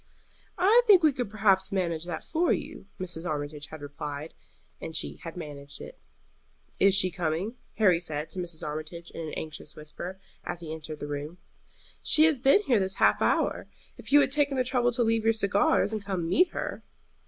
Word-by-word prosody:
"I 425 +6 +6
think 380 -5 +7
we 305 -3 +5
could 245 -5 -3
perhaps 195 -2 +2
manage 170 -4 -1
that 175 -3 -4
for 335 +2 +1
you," - - -4
Mrs. 175 -3 -4
Armitage 145 -2 -4
had 155 0 -10
replied, 145 +1 -6 0.5
and 160 - -6
she - - -3
had 165 +1 -9
managed 145 -3 -8
it. - - -10 0.8
"Is 195 -1 +5
she 185 -2 +2
coming?" 175 +5 -2 0.2
Harry 185 -6 +4
said 155 -3 -4
to 190 - -4
Mrs. 170 -3 -5
Armitage, 155 +3 -6
in - - -7
an 155 -2 -6
anxious 155 -1 -7
whisper, 175 +5 -7 0.2
as 175 - -5
he 160 -2 -6
entered 155 -1 -8
the 145 - -4
room. 145 +4 -5 0.6
"She 310 - +5
has 315 -4 +4
been 275 +11 +5
here 245 - +3
this 190 0 0
half - - +3
hour, - - +1 0.3
if - - -12
you 290 - +8
had 270 - +1
taken 285 -1 +2
the 255 - +3
trouble 245 -1 +1
to 240 - +2
leave 225 -1 +1
your 225 0 +4
cigars 205 0 +2
and 215 -2 -3
come 195 -3 -2
and 165 - -3
meet 360 - +4
her." - - -5
185 Hz, 200 wpm, -28 LUFS, 155-230 Hz, 0.8 s, you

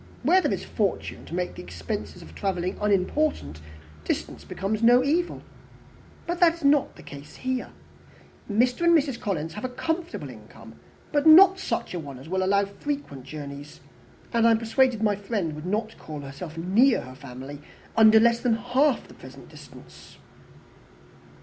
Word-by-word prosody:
Where 375 +2 +5
there - - 0
is - - -2
fortune - - -2
to - - -6
make 180 0 -2
the - - -9
expense 85 -2 -6
of 80 - -14
travelling 185 - -2
unimportant, 200 - 0 0.4
distance - - -3
becomes 205 +3 -3
no 245 +2 +6
evil. 330 +6 -1 0.8
But 345 +1 -3
that 335 -2 +5
is 335 - -13
not 285 0 +3
the - - -14
case 145 +1 -11
here. 255 -1 -3 0.8
Mr. 245 +7 +1
and 340 -1 +6
Mrs. 275 -5 -2
Collins 165 -5 -3
have 210 - -8
a 255 - -2
comfortable 325 +7 -4
income, - - -14 0.4
but 290 +1 +2
not 380 +4 +8
such - - -3
a 175 - -3
one 140 -4 -8
as 135 +4 -12
will 190 +2 -1
allow 200 +1 +3
of 200 - -7
frequent 280 - -5
journeys 145 0 -9 0.5
and 230 0 +4
I - - +6
am 225 - +4
persuaded 230 0 +1
my 210 -2 +2
friend 200 -5 -3
would 150 +3 -7
not 215 +3 -2
call 150 -2 -8
herself 145 +4 -9
near 215 +10 +3
her 130 - -10
family 135 +2 -9 0.4
under 220 0 +7
less 235 +1 +4
than 240 -2 +1
half 255 +4 +1
the - - -15
present - - -13
distance." - - -15
215 Hz, 170 wpm, -25 LUFS, 155-265 Hz, 0.8 s, not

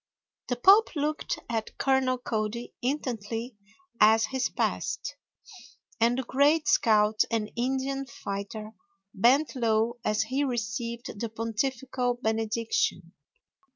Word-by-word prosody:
The 245 - 0
Pope 390 - +5
looked 300 +1 -1
at 225 -2 -3
Colonel 265 -1 +2
Cody 230 -1 -3
intently 240 -3 -3 0.4
as 220 +1 +6
he 265 - -4 0.2
passed, - - -1 0.8
and 235 +2 +3
the 265 - -1
great 290 +5 +2
scout 215 -1 +4
and 220 -2 -1
Indian 265 +2 -1
fighter 215 0 -6 0.4
bent 265 +9 +3
low 230 0 +1
as 215 0 +1
he 260 +6 -1
received 235 -2 -3
the 230 - -3
pontifical 245 +3 -2
benediction. 225 -1 -1
235 Hz, 110 wpm, -28 LUFS, 220-265 Hz, 0.8 s, as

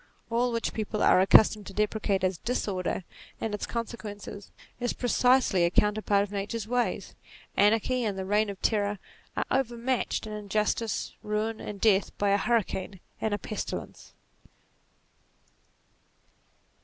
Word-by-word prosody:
All 240 +1 +2
which 230 -1 -1
people 215 -1 -2
are 185 - +6
accustomed 210 +1 +5
to 195 - -8
deprecate 210 -2 0
as 185 -3 0
"disorder" 195 -6 -2 0.4
and 220 -2 -2
its 210 - -3
con 235 -1 -2
sequences, 205 -3 -8 0.3
is 245 0 -1
precisely 245 -6 +3
a 170 - +4
counterpart 210 +1 +2
of 205 - -6
Nature's 205 +2 -3
ways. 245 +1 -1 0.4
Anarchy 225 +5 +3
and 205 -3 -1
the 190 - -3
Reign 210 +2 +2
of 195 -1 -6
Terror 205 -2 +1 0.4
are - - +1
overmatched 245 -2 0
in 215 - -6
injustice, 210 0 -1
ruin, 215 +1 -2
and 205 -1 -6
death, 205 -2 +2
by 205 - +1
a 200 - +4
hurricane 200 -5 -1 0.2
and 220 - 0
a 205 - +1
pestilence. 215 - -6
210 Hz, 140 wpm, -28 LUFS, 200-230 Hz, 0.4 s, are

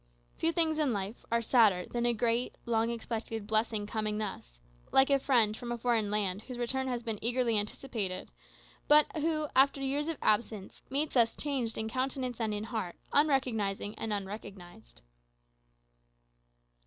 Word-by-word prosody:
Few 330 - +2
things 320 -2 +2
in 290 -6 +2
life 200 +3 -4
are 235 0 +2
sadder 215 -7 +4
than 240 0 -1
a 240 - +3
great, 235 +2 0
long 230 -1 +1
expected 225 -2 -4
blessing 220 0 +1
coming 215 0 -2
thus; 190 - -6 0.3
like 270 +1 +5
a 275 - +5
friend 235 -6 +3
from 240 +1 -6
a 240 - -2
foreign 230 -3 +1
land 200 -2 0
whose 250 +2 -8
return 265 +2 -1
has 245 -2 -2
been 225 -3 -3
eagerly 240 -1 +2
anticipated, 205 -3 -4 0.6
but 300 0 +7
who, 310 0 0
after 275 +1 +5
years 275 +2 -1
of 330 -2 -2
absence, 210 -2 0
meets 285 +3 -1
us 230 -2 +4
changed 260 -6 -2
in 220 - -2
countenance 255 0 -2
and 220 -1 0
in 210 0 -3
heart, 220 -6 -4 0.2
unrecognizing 240 -9 +1
and 225 - -4
unrecognized. 200 -1 -7
230 Hz, 155 wpm, -31 LUFS, 210-265 Hz, 0.6 s, but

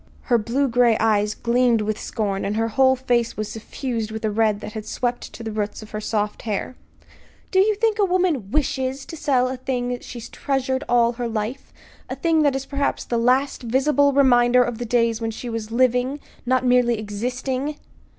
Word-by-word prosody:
Her 240 -3 +2
blue 250 +6 0
gray 240 -2 +3
eyes 210 -1 +1
gleamed 240 -1 +2
with 215 0 -2
scorn, 200 -4 -2
and 205 - -2
her 225 0 +1
whole 260 +3 +4
face 245 -2 0
was 215 -1 -3
suffused 225 0 -4
with 220 0 -5
a 215 - 0
red 215 -1 +1
that 210 - -7
had 215 -1 -6
swept 245 +2 -3
to 235 - -9
the 220 - -4
roots 210 0 -3
of 215 - -13
her 215 - -4
soft 210 -1 -2
hair. 220 +3 -3 0.8
"Do 375 - +3
you 420 +2 +4
think 440 0 +1
a 405 - +5
woman 355 - 0
wishes 265 0 -1
to 330 - -8
sell 280 -5 +1
a 260 0 -4
thing 250 -1 -2
that 245 0 -4
she's 240 -2 -8
treasured 265 -1 -2
all 235 -1 +4
her 240 0 -4
life, 225 +4 -4 0.4
a - - -3
thing 325 -2 +2
that 285 -3 +3
is 270 0 -3
perhaps 280 0 -2
the 235 - -1
last 255 +4 +2
visible 280 +4 +2
reminder 250 -2 +5
of 240 -1 -4
the 240 - -3
days 230 -1 +1
when 225 - -1
she 235 +2 -6
was 225 -1 -4
living 250 +3 +1 0.3
not 255 0 +2
merely 245 -2 +3
existing?" 250 +7 -3
245 Hz, 200 wpm, -22 LUFS, 225-265 Hz, 0.8 s, a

